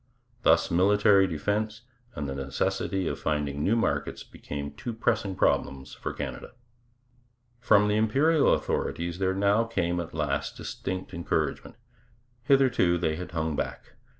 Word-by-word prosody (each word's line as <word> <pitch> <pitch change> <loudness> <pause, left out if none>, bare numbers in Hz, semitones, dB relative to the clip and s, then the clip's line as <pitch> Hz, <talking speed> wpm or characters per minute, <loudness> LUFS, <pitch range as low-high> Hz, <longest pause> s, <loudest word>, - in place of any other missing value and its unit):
Thus - - +3
military 100 +2 +4
defence 105 +7 -2 0.3
and 70 - -3
the 70 - -3
necessity 95 +7 -2
of - - -3
finding 75 -1 -1
new 110 - +3
markets 115 - -1
became 70 0 -7
two 115 +11 -6
pressing 100 -3 0
problems 65 -5 0
for - - -5
Canada. - - -6 1.1
From 105 -3 +4
the 105 0 +2
Imperial 140 +9 +3
authorities 85 +1 -1
there 95 -1 +1 0.3
came 90 -6 -1
now 85 - -1
at 85 - -12
last 75 -3 -2
distinct 95 0 -5
encouragement. 85 0 -2 0.7
Hitherto 130 -10 +3
they 80 -2 0
had 90 +1 -7
hung 80 -2 -1
back. - - -5
95 Hz, 135 wpm, -27 LUFS, 80-105 Hz, 1.1 s, military